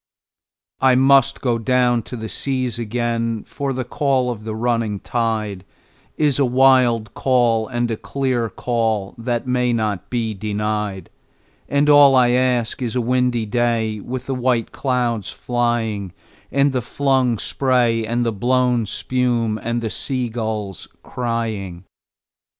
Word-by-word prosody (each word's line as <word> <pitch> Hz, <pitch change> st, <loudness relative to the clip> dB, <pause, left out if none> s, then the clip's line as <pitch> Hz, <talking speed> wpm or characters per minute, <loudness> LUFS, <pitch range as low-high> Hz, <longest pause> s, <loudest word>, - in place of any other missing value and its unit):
I 130 Hz, -1 st, +4 dB
must 135 Hz, 0 st, +4 dB
down 120 Hz, 0 st, +2 dB
go -, -, -4 dB
to 125 Hz, -, -9 dB
the 110 Hz, 0 st, -5 dB
seas 130 Hz, -2 st, -2 dB
again, 115 Hz, -1 st, -2 dB
for 140 Hz, -1 st, -4 dB
the 130 Hz, -1 st, -2 dB
call 130 Hz, 0 st, 0 dB
of 110 Hz, -2 st, -8 dB
the 110 Hz, -1 st, -4 dB
running 115 Hz, -3 st, -1 dB
tide 110 Hz, -5 st, -2 dB, 0.5 s
Is 145 Hz, -3 st, +2 dB
a -, -, +4 dB
wild 125 Hz, -4 st, +3 dB
call 120 Hz, -4 st, +2 dB
and 120 Hz, -2 st, -1 dB
a 110 Hz, -, -2 dB
clear 130 Hz, -4 st, -1 dB
call 110 Hz, -3 st, -1 dB
that 120 Hz, +1 st, -2 dB
may 125 Hz, -1 st, +1 dB
not 110 Hz, -4 st, -2 dB
be 115 Hz, -3 st, -1 dB
denied; 105 Hz, -1 st, -3 dB, 0.6 s
And 140 Hz, +1 st, +2 dB
all 145 Hz, -2 st, +7 dB
I 125 Hz, -1 st, +5 dB
ask 125 Hz, -1 st, +1 dB
is 120 Hz, -1 st, -3 dB
a -, -, +2 dB
windy 125 Hz, -1 st, +1 dB
day 115 Hz, -1 st, 0 dB
with 130 Hz, +4 st, -6 dB
the 135 Hz, -, -2 dB
white 125 Hz, -2 st, 0 dB
clouds 120 Hz, -6 st, -1 dB
flying, 115 Hz, -6 st, -2 dB, 0.4 s
And 140 Hz, 0 st, +3 dB
the 130 Hz, -1 st, -1 dB
flung 130 Hz, -1 st, +1 dB
spray 120 Hz, -2 st, +1 dB
and 120 Hz, +2 st, -1 dB
the 115 Hz, -, +1 dB
blown 125 Hz, +1 st, +1 dB
spume, 120 Hz, -2 st, -1 dB
and 115 Hz, 0 st, -2 dB
the 110 Hz, -, -2 dB
sea 130 Hz, -3 st, -2 dB
gulls 110 Hz, -5 st, -4 dB, 0.2 s
crying. 110 Hz, -7 st, -3 dB
120 Hz, 145 wpm, -20 LUFS, 110-125 Hz, 0.6 s, all